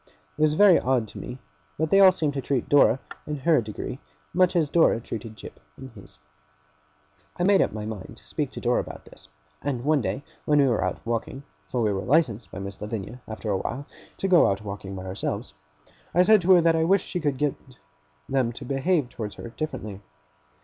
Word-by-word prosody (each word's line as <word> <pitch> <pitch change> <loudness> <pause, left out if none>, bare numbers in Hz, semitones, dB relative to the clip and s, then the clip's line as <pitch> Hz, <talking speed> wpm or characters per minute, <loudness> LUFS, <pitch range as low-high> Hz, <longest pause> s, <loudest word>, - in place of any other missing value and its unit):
It - - -6
was 155 0 +4
very 195 -1 +7
odd 125 -3 +1
to - - -9
me; 125 - -7 0.4
but 160 0 -1
they 195 - +6
all 190 -1 +9
seemed 155 -5 -1
to 135 - -3
treat 130 -1 -1
Dora, 140 -3 +5 0.3
in 150 - -2
her 160 -3 +4
degree, 105 -2 -6 0.3
much 180 0 +3
as 165 -3 +3
Dora 160 -6 +3
treated 115 -1 -7
Jip 105 - -11 0.2
in 130 0 -9
his. 100 -9 -15 1.2
I 175 - 0
made 195 +1 +5
up - - +1
my 105 0 -5
mind 105 -4 -7
to - - -18
speak - - -3
to - - -6
Dora - - +1
about - - -7
this; 75 - -15 0.3
and 130 -4 -2
one 150 0 +2
day 105 +6 -3 0.2
when 150 - +3
we 140 - +5
were 120 -4 +1
out - - -1
walking 115 +4 -3 0.2
(for 120 -2 -1
we 105 -2 +1
were 95 - -2
licensed 125 -3 +1
by - - -8
Miss 100 0 -7
Lavinia, 110 +3 -5
after 110 -1 -4
a 95 - +1
while, 140 +8 -4 0.3
to 195 - -1
go 180 -3 +6
out 100 +1 -2
walking 100 -1 -6
by 95 0 -7
ourselves), 100 +1 -4 0.6
I 180 - +6
said 215 +1 +6
to 185 +2 +5
her 175 - +6
that 165 0 +3
I 160 - +2
wished 190 +3 +3
she 180 - -3
could 145 -5 -1
get 145 0 +1 0.7
them 130 -3 +1
to 130 - -9
behave 140 +3 +1
towards 110 -4 -6
her - - -8
differently. 110 -8 -6
130 Hz, 215 wpm, -25 LUFS, 110-160 Hz, 1.2 s, all